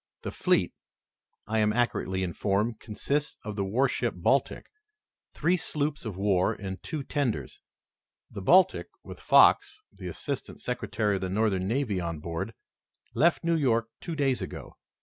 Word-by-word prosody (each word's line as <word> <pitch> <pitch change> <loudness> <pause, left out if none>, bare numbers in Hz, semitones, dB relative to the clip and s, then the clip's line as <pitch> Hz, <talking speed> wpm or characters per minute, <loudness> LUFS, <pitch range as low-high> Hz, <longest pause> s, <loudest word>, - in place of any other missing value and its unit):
The - - -3
fleet, - - +1 0.7
I 110 +1 0
am 105 0 +3
accurately 105 -5 0
informed, 100 +5 -1
consists 140 +7 -2
of 105 -1 -4
the 100 - -1
warship 120 +3 0
Baltic, 130 +11 +1 0.7
three 180 +2 +2
sloops 150 -4 -2
of 105 -5 -5
war 95 -2 +2
and 95 -1 -6
two 155 -3 -4
tenders. 140 -6 -2 0.7
The 100 - -6
Baltic, 185 - +4 0.2
with - - -10
Fox, 425 0 +5
the - - -8
assistant - - -5
secretary 105 -4 -1
of - - -7
the 95 - -2
Northern 95 -2 +1
Navy, 115 -4 0
on 85 -2 -3
board, 85 +7 -4 0.6
left 170 +3 +3
New 170 0 +2
York 115 -7 +1
two 165 - -5
days 135 -4 +1
ago. - - -7
110 Hz, 150 wpm, -28 LUFS, 95-140 Hz, 0.7 s, Fox